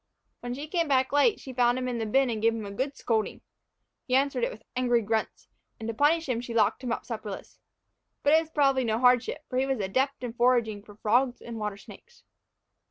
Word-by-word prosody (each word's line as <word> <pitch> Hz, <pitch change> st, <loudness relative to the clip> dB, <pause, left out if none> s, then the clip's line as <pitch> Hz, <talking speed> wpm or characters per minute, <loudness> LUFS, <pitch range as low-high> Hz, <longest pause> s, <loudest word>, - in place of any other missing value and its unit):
When 245 Hz, 0 st, -5 dB
she 290 Hz, +3 st, -6 dB
came 335 Hz, 0 st, 0 dB
back 265 Hz, -2 st, +2 dB
late, 290 Hz, +10 st, +3 dB
she 260 Hz, -, -9 dB
found 245 Hz, 0 st, +3 dB
him 255 Hz, 0 st, -2 dB
in 245 Hz, -2 st, -2 dB
the 225 Hz, -, -2 dB
bin 265 Hz, +3 st, +2 dB
and 220 Hz, -2 st, -3 dB
gave 230 Hz, +1 st, +3 dB
him 220 Hz, -2 st, -5 dB
a 200 Hz, -, -6 dB
good 265 Hz, +7 st, -3 dB
scolding. 220 Hz, -2 st, -1 dB, 0.7 s
He 255 Hz, -, +2 dB
answered 270 Hz, -2 st, +1 dB
it -, -, +2 dB
with 215 Hz, -, -11 dB
angry 245 Hz, -2 st, +2 dB
grunts, 220 Hz, +1 st, -2 dB, 0.3 s
and 220 Hz, -, -5 dB
to 230 Hz, -, -2 dB
punish 300 Hz, +7 st, +2 dB
him 240 Hz, -3 st, -1 dB
she 235 Hz, -1 st, -7 dB
locked 220 Hz, +3 st, +2 dB
him 245 Hz, -, -2 dB
up -, -, -3 dB
supperless. 215 Hz, -4 st, -7 dB, 0.6 s
But 285 Hz, -, +4 dB
it 320 Hz, -, +6 dB
was 320 Hz, -, -10 dB
probably 275 Hz, -4 st, +2 dB
no 220 Hz, -2 st, 0 dB
hardship, 250 Hz, +4 st, +2 dB
for 255 Hz, -, -1 dB
he 265 Hz, -, +1 dB
was 270 Hz, -1 st, 0 dB
an 210 Hz, -, -3 dB
adept 260 Hz, +7 st, -1 dB
in 240 Hz, -2 st, -4 dB
foraging 235 Hz, -4 st, +2 dB
for 205 Hz, 0 st, -15 dB
frogs 245 Hz, +4 st, +1 dB
and 230 Hz, -1 st, -8 dB
water 210 Hz, -2 st, -3 dB
snakes. 480 Hz, -, -15 dB
245 Hz, 230 wpm, -27 LUFS, 225-270 Hz, 0.7 s, it